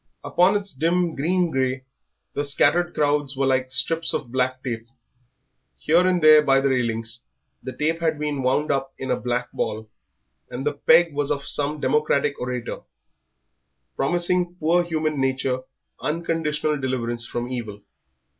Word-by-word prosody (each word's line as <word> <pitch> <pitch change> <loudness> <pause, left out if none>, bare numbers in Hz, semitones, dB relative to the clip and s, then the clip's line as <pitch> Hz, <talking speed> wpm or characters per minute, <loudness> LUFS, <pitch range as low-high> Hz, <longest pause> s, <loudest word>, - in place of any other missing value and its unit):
Upon 180 +4 +3
its 200 -3 -2
dim 170 +4 +1
green 175 +4 0
grey 130 -1 -1 0.5
the 145 - -1
scattered 175 +4 +2
crowds 145 -2 0
were 135 - +1
like 130 -1 +1
strips 165 +6 0
of 120 - -4
black 130 0 -1
tape. 115 -3 -4 0.9
Here 175 +4 +3
and 180 -3 +1
there 155 0 +8
by 135 -2 +3
the 135 0 +1
railings 115 -2 -1 0.4
the 130 - -8
tape 160 +2 0
had 160 -2 0
been 150 -2 -2
wound 135 +4 +1
up 135 -1 -2
in 130 - -4
a - - +3
black 125 0 -3
ball, 110 0 -4 0.6
and 130 +3 -5
the 150 - +1
peg 165 +3 +4
was 145 0 -1 0.2
some 145 +1 -1
democratic 145 +1 +1
orator, 125 -1 -4 1.2
promising 175 +3 +1
poor 170 +1 +2
human 155 -4 -1
nature 130 -1 0 0.4
unconditional 155 -2 -1
deliverance 120 -3 -2
from 120 0 -4
evil. 110 -5 -6
145 Hz, 145 wpm, -23 LUFS, 130-160 Hz, 1.2 s, there